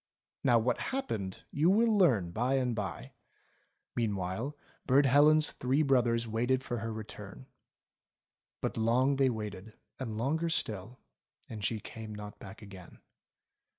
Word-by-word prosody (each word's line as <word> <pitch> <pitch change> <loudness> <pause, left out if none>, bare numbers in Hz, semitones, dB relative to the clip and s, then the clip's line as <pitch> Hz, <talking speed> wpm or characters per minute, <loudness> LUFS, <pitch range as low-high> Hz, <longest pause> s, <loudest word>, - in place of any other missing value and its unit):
Now 120 -4 +5
what 115 +2 +1
happened 110 - -3
you 155 +4 +3
will 220 +3 +4
learn 120 - +3
by 125 +8 0
and 125 -2 +1
by; 100 -5 -5 0.8
mean 110 -4 0
while, 100 +11 -3 0.3
Burd 140 +2 +5
Helen's 150 +3 +5
three 130 +5 +1
brothers 120 -4 +2
waited 120 +4 0
for 120 -3 -3
her 115 +1 -4
return. 110 - -8 1.2
But - - -2
long 125 +5 +2
they 135 -1 +4
waited, 105 -2 -5 0.3
and 115 -5 -4
longer 155 +8 0
still, 110 - -2 0.5
And 105 -2 -7
she 110 +1 0
came 110 0 -8
not 105 0 -9
back 100 +3 -11
again. 95 -3 -12
115 Hz, 140 wpm, -31 LUFS, 105-135 Hz, 1.2 s, Now